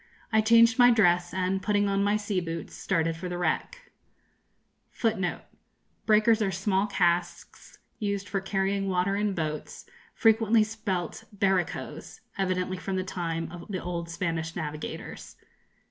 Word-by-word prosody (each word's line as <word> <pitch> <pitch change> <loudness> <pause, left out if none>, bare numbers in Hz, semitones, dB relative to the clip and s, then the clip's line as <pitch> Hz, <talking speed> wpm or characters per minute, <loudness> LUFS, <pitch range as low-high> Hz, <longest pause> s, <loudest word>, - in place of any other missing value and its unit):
I 220 - +5
changed 230 +3 +5
my 245 0 +8
dress, 175 -6 +3
and, 190 +1 -1
putting 205 -1 +1
on 200 0 +1
my 205 +1 +2
sea 205 -2 -1
boots, 165 -1 -5
started 165 0 0
for 180 +2 -6
the 175 - -3
wreck. 485 - -2 1.0
[Footnote 195 -6 -1 0.7
1: 215 -1 +4
Small 190 +2 0
casks, 175 -3 -1 0.2
used 200 -1 -2
for 195 - -2
carrying 195 0 -1
water 185 +1 +1
in 205 -1 0
boats, 155 -3 -4 0.3
frequently 225 0 +4
spelt 210 -6 -4
barricos, 195 -3 -2
evidently 185 -1 -1
from 190 +1 -4
the 185 - 0
time 165 -3 -3
of 175 -1 -9
the 190 -3 -2
old 170 -1 -4
Spanish 165 -1 -3
navigators. 150 -2 -6
190 Hz, 135 wpm, -27 LUFS, 175-210 Hz, 1.0 s, my